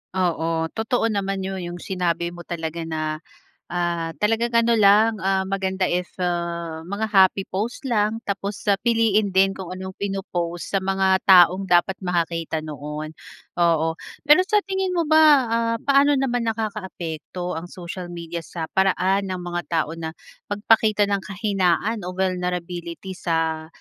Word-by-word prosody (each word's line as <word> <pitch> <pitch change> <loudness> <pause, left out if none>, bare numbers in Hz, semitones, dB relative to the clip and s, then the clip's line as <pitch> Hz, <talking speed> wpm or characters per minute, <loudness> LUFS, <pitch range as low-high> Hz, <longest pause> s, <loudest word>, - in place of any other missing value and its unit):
Oo 165 -3 0
totoo 225 0 0
naman 195 -1 -2
'yon, 190 0 -4
yung 175 0 -7
sinabi 175 -2 -1
mo 175 - -11
talaga 165 -1 -4
na, 155 -1 -3 0.5
ah, 170 -1 -1
talagang 225 +3 +1
ano 230 0 +3
lang, 215 +1 +5
ah, 190 0 +1
maganda 190 -1 -1
if 180 0 -1
ah 170 -2 -2
mga 200 +6 -3
happy 195 -2 +4
post 235 +8 -4
lang, 215 -2 +1
tapos 200 0 -3
sa 200 - +5
piliin 225 -3 +2
din 195 +1 +3
kung 190 -3 -8
anong 185 +1 -6
pino-post 185 -3 -4
sa 195 - +2
mga 190 0 +2
taong 185 0 +6
dapat 175 +2 +4
makakita 165 -2 -1
noon. 150 +1 -6 0.4
Oo 165 -2 +2 0.3
pero 300 +5 +7
sa 420 +3 +2
tingin 380 -1 -1
mo 335 -3 +1
ba 315 +1 +5 0.3
ah, 230 0 +1
paano 280 0 +4
naman 245 -3 0
nakakaapekto 185 -6 -5
ang 165 +2 -7
social 175 0 -7
media 170 -1 -6
sa 165 0 -6
paraan 190 +1 +2
ng 185 - -3
mga 175 0 -4
tao 160 -1 0
na 165 -1 -5 0.4
magpakita 210 0 +3
ng 200 -1 -1
kahinaan 200 +1 0
o - - -3
vulnerability 180 -1 -3
sa 160 -2 -1
190 Hz, 150 wpm, -23 LUFS, 170-210 Hz, 0.5 s, pero